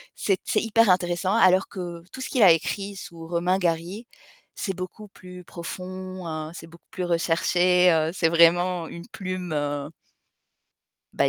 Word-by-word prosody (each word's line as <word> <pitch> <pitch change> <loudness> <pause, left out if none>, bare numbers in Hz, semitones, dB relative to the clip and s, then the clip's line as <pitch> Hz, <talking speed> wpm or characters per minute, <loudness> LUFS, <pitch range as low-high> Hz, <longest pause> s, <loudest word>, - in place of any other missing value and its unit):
c'est 195 -2 0
c'est - - 0
hyper 225 -1 +3
intéressant 180 +2 +1
alors 185 -3 +4
que 175 -3 -7
tout - - -10
ce - - -4
qu'il 255 - 0
a 185 - +9
écrit 195 +5 -1
sous 165 -3 -10
Romain 175 +2 +1
Gary. 175 +5 -2 0.5
C'est 195 -3 -3
beaucoup 185 +4 -7
plus 180 -2 -13
profond, 185 +1 -7
heu, 155 -1 -5
c'est 170 -3 -10
beaucoup 170 +1 -17
plus 180 - -3
recherché, 175 +1 +3
heu, 160 -1 +2
c'est 165 -3 +1
vraiment 170 +1 +4
une 170 +1 -10
plume, 185 -2 -5
heu 145 -1 -2 1.2
bah, - - +2
180 Hz, 160 wpm, -25 LUFS, 170-185 Hz, 1.2 s, a